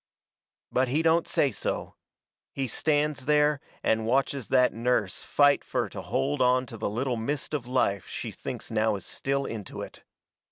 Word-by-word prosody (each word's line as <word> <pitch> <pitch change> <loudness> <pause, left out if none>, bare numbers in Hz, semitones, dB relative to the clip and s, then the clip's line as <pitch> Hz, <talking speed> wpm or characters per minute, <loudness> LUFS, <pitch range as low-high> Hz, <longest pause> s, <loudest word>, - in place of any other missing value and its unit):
But 130 +1 +2
he 150 +6 +1
don't 165 +1 +3
say 140 - +2
so. - - -3 0.6
He 135 -1 -2
stands 150 +2 0
there 150 0 +3 0.2
and 110 0 +1
watches 135 0 +1
that 125 -1 +4
nurse 115 -4 0
fight 145 0 +3
fur - - -1
to - - -6
hold 130 - -1
onto 125 -1 +2
the 110 - -2
little 120 +3 -1
mist 140 +7 -3
of 135 -5 -2
life 100 -7 +1
she - - -5
thinks - - -7
now 110 0 +2
is 95 - -7
still 140 0 -1
into 105 -4 -6
it. - - -11
130 Hz, 165 wpm, -27 LUFS, 115-145 Hz, 0.6 s, that